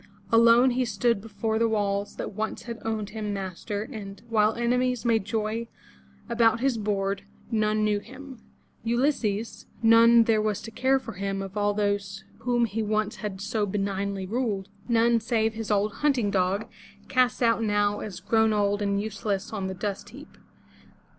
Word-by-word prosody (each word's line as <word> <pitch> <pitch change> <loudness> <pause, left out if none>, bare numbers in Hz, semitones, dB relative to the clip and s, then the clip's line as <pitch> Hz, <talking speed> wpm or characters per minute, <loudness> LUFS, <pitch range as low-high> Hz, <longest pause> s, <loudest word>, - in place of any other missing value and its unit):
Alone, 230 +2 +6
he 255 +1 +1
stood 230 -1 0
before 220 +1 -2
the 230 0 +3
walls 200 -2 -1
that - - -5
once 220 +2 -3
had 235 -1 -6
owned 215 -2 -3
him 210 -1 -4
master, 195 +2 -4
and, 210 -6 -9
while 215 -1 +3
enemies 250 +1 0
made 225 -4 +2
joy 220 +1 -2 0.6
about 230 -1 +3
his 265 0 +1
board, 200 -1 -1 0.3
none 215 -1 +1
knew 210 -1 +2
him, 265 +3 -11 0.4
Ulysses; 235 -3 -1 0.2
none 230 +1 +7
there 220 -1 +2
was 215 -2 -1
to 225 - -8
care 260 +4 +2
for 260 - -7
him, 195 +1 -3
of 195 +1 -8
all 205 0 +1
those 200 -1 -1 0.2
over - - -21
whom 240 -1 +3
he 225 0 -3
once 215 0 -1
had 200 -3 -5
so 205 +1 -1
benignly 195 -1 -2
ruled, 205 -3 -2 0.2
none, 235 0 +3
save 225 -1 0
his 225 -1 -5
old 210 0 +1
hunting 265 -9 +1
dog, 190 +2 +1 0.4
cast 255 -1 +2
out 230 -1 +3
now 205 -1 +1
as 195 -4 -6
grown 220 +2 +3
old 205 0 +1
and 200 -1 +1
useless 205 -1 -3
on 195 -3 -2
the 190 - -4
dust 200 +1 -4
heap. - - -13
215 Hz, 170 wpm, -26 LUFS, 200-230 Hz, 0.6 s, none